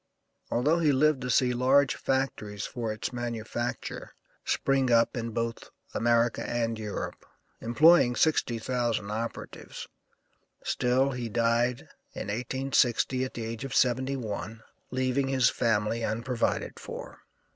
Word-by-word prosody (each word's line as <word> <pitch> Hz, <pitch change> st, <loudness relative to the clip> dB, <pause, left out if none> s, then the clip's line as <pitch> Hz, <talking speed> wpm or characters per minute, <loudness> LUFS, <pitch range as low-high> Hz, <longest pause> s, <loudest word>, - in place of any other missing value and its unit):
Although 150 Hz, +8 st, +2 dB
he 155 Hz, -3 st, +3 dB
lived 145 Hz, 0 st, +3 dB
to 125 Hz, -, -3 dB
see 125 Hz, +1 st, +3 dB
large 130 Hz, +3 st, +4 dB
factories 110 Hz, -6 st, -2 dB
for 120 Hz, -3 st, -3 dB
its 110 Hz, +4 st, -4 dB
manufacture 120 Hz, 0 st, -4 dB, 0.3 s
spring 135 Hz, -2 st, +1 dB
up 115 Hz, +2 st, +4 dB
in 115 Hz, -1 st, -3 dB
both 115 Hz, +1 st, -3 dB, 0.2 s
America 120 Hz, 0 st, +2 dB
and 115 Hz, -2 st, -1 dB
Europe, 105 Hz, -2 st, -5 dB, 0.4 s
employing 125 Hz, +1 st, +5 dB
60,000 120 Hz, -7 st, 0 dB
operatives, 115 Hz, +2 st, -6 dB, 0.8 s
still 130 Hz, +3 st, +1 dB
he 125 Hz, -3 st, -4 dB
died 120 Hz, +2 st, +1 dB, 0.3 s
in -, -, -5 dB
1860 130 Hz, +1 st, +1 dB
at 130 Hz, -, -8 dB
the 115 Hz, -, -4 dB
age 115 Hz, +2 st, -5 dB
of 135 Hz, 0 st, -4 dB
seventy 130 Hz, +2 st, +2 dB
one, 110 Hz, -2 st, -5 dB, 0.3 s
leaving 130 Hz, +1 st, 0 dB
his 130 Hz, -2 st, +3 dB
family 115 Hz, 0 st, 0 dB
unprovided 115 Hz, +3 st, -1 dB
for. -, -, -8 dB
120 Hz, 125 wpm, -28 LUFS, 115-130 Hz, 0.8 s, employing